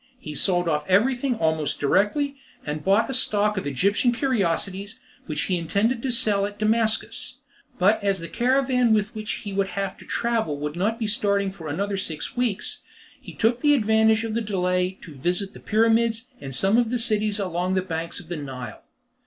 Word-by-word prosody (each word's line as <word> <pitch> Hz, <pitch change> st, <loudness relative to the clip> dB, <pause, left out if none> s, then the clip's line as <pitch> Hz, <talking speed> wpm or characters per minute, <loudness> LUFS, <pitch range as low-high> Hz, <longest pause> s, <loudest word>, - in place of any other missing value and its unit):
He 150 Hz, -, -7 dB
sold 175 Hz, +3 st, +1 dB
off 150 Hz, -2 st, +1 dB
everything 245 Hz, +6 st, +2 dB
almost 160 Hz, -5 st, 0 dB
directly, 210 Hz, -, +1 dB, 0.3 s
and 150 Hz, 0 st, -4 dB
bought 200 Hz, +4 st, +3 dB
a 265 Hz, -, -4 dB
stock 210 Hz, -4 st, +2 dB
of 190 Hz, -7 st, -3 dB
Egyptian 200 Hz, -, +2 dB
curiosities, 200 Hz, -, -1 dB, 0.3 s
which 155 Hz, -2 st, -2 dB
he 180 Hz, -2 st, 0 dB
intended 205 Hz, +9 st, 0 dB
selling 205 Hz, -4 st, +2 dB
at -, -, -24 dB
Damascus; 220 Hz, +1 st, 0 dB, 0.4 s
but 205 Hz, +3 st, +3 dB
as 195 Hz, -1 st, +1 dB
the 170 Hz, -, -6 dB
caravan 250 Hz, 0 st, +2 dB
with 210 Hz, +2 st, -1 dB
which 215 Hz, -1 st, -4 dB
he 200 Hz, -, -4 dB
would 195 Hz, 0 st, +1 dB
have 195 Hz, -1 st, -3 dB
to -, -, -13 dB
travel 225 Hz, -10 st, 0 dB
would 150 Hz, +1 st, -4 dB
not 210 Hz, +6 st, 0 dB
be 230 Hz, -, -2 dB
starting 200 Hz, -2 st, +1 dB
for 175 Hz, -5 st, -9 dB
another 195 Hz, +7 st, -2 dB
six 160 Hz, -5 st, -5 dB
weeks, 240 Hz, -5 st, -1 dB, 0.4 s
he -, -, -10 dB
took 235 Hz, +3 st, +1 dB
advantage 220 Hz, -5 st, +4 dB
of 225 Hz, -1 st, -3 dB
the 230 Hz, -, 0 dB
delay 180 Hz, -2 st, 0 dB
to 160 Hz, -, -10 dB
visit 180 Hz, +8 st, -2 dB
the -, -, -11 dB
Pyramids, 225 Hz, +2 st, +2 dB
and 135 Hz, -2 st, -6 dB
some 195 Hz, -, +3 dB
of 235 Hz, -2 st, +1 dB
the 245 Hz, -, 0 dB
cities 215 Hz, -3 st, +1 dB
along 185 Hz, -1 st, -1 dB
the 185 Hz, -, +1 dB
banks 165 Hz, -2 st, -4 dB
of 170 Hz, -, -12 dB
the 175 Hz, -1 st, -4 dB
Nile. 130 Hz, -4 st, -7 dB
200 Hz, 185 wpm, -24 LUFS, 180-225 Hz, 0.4 s, advantage